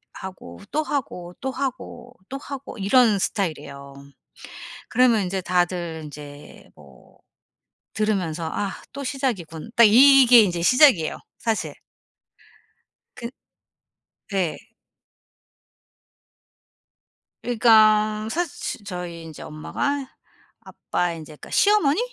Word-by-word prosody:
하고 185 - -10
또 310 - 0
하고, 180 - -4
또 265 - -2
하고, 255 -2 -6
또 270 - -5
하고 275 -2 -8
이런 215 +2 +3
스타일이에요. 150 -8 -4 1.0
그러면 235 -3 +3
인제 190 +1 -2
다들 175 -3 -1
인제 145 -1 -12
뭐 70 -4 -19 0.8
들으면서 180 -7 -1
'아 200 -2 -2 0.2
또 280 0 -6
시작이군.' 225 - -4
딱 235 - +7
이 270 +6 +7
이게 245 -1 +8
인제 175 -4 -1
시작이에요 250 - +4 0.2
사실. 225 -2 -2 1.4
그 235 - -6 1.0
네. 190 -5 -1 2.8
그러니까 215 -2 +3
사실 340 +5 -2 0.3
치 - - -21
저희 180 -3 -7
인제 160 -2 -11
엄마가 275 - -3 0.5
아빠의 175 -1 -3
인제 155 0 -11
그러니까 150 - -13
시어머니? 405 -6 +3
210 Hz, 220 characters per minute, -23 LUFS, 170-255 Hz, 2.8 s, 이게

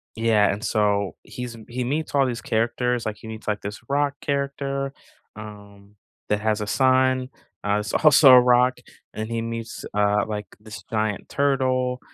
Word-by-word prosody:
yeah, 110 -2 +3
and 105 - -7
so 100 -3 0
he's 125 -1 -7
m 110 -2 -13
he 125 +1 -3
meets 145 +4 -2
all 140 - +4
these 120 -2 -3
characters, 120 +2 -1
like, 110 -1 -3
he - - -11
meets, 110 0 -8
like, 105 -1 0
this 105 +2 -7
rock 145 0 +1
character, 140 -1 -2 0.4
um, 100 -1 -12 0.3
that 105 0 0
has 110 0 0
a 105 - -2
son, 130 +1 +2 0.3
uh, 105 0 +1
that's 105 -1 -4
also 150 -3 +7
a 125 - +9
rock. 125 +1 +3 0.3
And 110 +1 -5
he 115 0 -2
meets, 115 -1 -6
uh, 105 0 +2
like, 105 -2 -4
this 105 -3 -10
giant 110 -2 -2
turtle, 130 -2 0
115 Hz, 175 wpm, -23 LUFS, 105-130 Hz, 0.4 s, a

